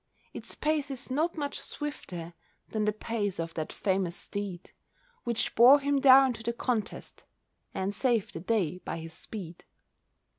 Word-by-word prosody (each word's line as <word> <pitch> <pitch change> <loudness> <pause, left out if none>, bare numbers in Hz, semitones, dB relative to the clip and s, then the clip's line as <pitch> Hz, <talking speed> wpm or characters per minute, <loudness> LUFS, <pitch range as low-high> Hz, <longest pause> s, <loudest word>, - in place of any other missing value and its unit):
Its - - -5
pace 300 -2 0
is 265 -1 -6
not 320 +6 0
much 285 -2 -2
swifter 180 - -5 0.4
Than 215 -1 -1
the 210 - +3
pace 210 -3 -3
of 165 0 -3
that 155 -1 -4
famous 190 -3 0
steed 200 -3 -6 0.5
Which 235 -2 -1
bore 255 +5 +8
him 285 0 +1
down 265 -1 +8
to 225 - -9
the 235 +1 -1
contest 230 -3 -3 0.5
And 190 +2 -1
saved 235 -3 +1
the - - -5
day 180 -2 0
by 165 - -5
his 165 0 -7
speed. 175 -1 -7
220 Hz, 155 wpm, -29 LUFS, 185-265 Hz, 0.5 s, bore